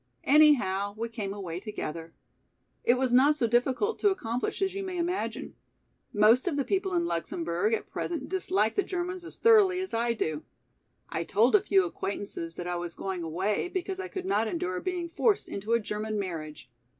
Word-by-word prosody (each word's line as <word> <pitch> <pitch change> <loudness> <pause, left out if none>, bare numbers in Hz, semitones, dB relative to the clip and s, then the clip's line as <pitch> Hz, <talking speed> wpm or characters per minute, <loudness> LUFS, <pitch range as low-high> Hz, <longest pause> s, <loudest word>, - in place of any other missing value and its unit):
Anyhow 220 -10 +4
we 230 +1 -3
came 210 -4 -4
away 180 -4 -5
together. 165 -6 -6 0.7
It 240 - +4
was 255 -1 0
not 280 +4 +6
so 260 - +1
difficult 255 - +1
to 410 - +4
accomplish 245 - -2
as 385 -1 0
you 395 - -3
may 375 -2 -4
imagine. 350 +2 -2 0.6
Most 225 - +4
of 310 -5 0
the 280 - +1
people 385 -1 0
in 345 0 +2
Luxemburg 170 - -1
at - - -7
present 330 -6 -4
dislike 220 - 0
the - - +2
Germans 365 -1 -4
as 345 - -10
thoroughly 415 -5 +5
as 375 0 -4
I 235 +1 +1
do. 155 -8 -2 0.7
I 165 - -2
told 220 +8 +3
a 415 - +6
few 390 -1 +3
acquaintances 195 - -4
that 175 - -6
I 175 0 -2
was 175 -1 -5
going 190 -2 -4
away 185 - -1
because 375 +1 -4
I 380 - -4
could 370 0 -6
not 230 - +1
endure 185 - -2
being 360 -2 -2
forced 405 +5 +1
into 210 +3 -3
a 235 - +4
German 215 0 -3
marriage. 160 -9 -5
235 Hz, 185 wpm, -28 LUFS, -, 0.7 s, not